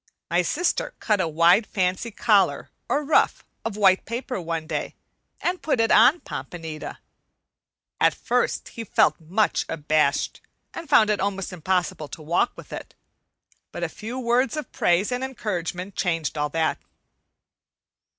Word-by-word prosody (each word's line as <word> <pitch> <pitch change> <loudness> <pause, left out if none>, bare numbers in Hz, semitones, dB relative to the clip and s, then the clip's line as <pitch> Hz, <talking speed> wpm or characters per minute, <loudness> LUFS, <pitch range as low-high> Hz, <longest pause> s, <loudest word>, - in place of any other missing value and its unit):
My 175 +1 +4
sister 330 - -1
cut 210 -4 +1
a 170 - 0
wide, 170 +7 +4
fancy 185 +4 -1
collar, 210 -2 +2 0.2
or 285 +4 +1
ruff, 305 - +2 0.2
of 225 -2 -4
white 190 -2 +4
paper 240 -2 -4
one 165 -1 -3
day, - - -4 0.4
and 360 +1 -1
put 295 -6 0
it 225 -1 +3
on 255 +10 +6
Pompanita. 160 -3 -7 1.0
At - - +4
first - - -1
he 230 - -7
felt 155 -7 +2
much 190 +7 +1
abashed 155 -2 0 0.3
and 330 -2 -8
found 215 -7 +5
it 210 - 0
almost 195 -1 -2
impossible 180 -3 -1
to 155 - -9
walk 165 +3 +1
with - - -11
it. - - -8 0.8
But - - -5
a - - -1
few 225 +4 -7
words 255 +4 +1
of 305 - -5
praise 175 +6 +2
and 250 +1 -2
encouragement 190 -7 -4
changed 165 -5 -1
all 150 -1 -1
that. 160 +1 0
195 Hz, 150 wpm, -24 LUFS, 165-235 Hz, 1.0 s, on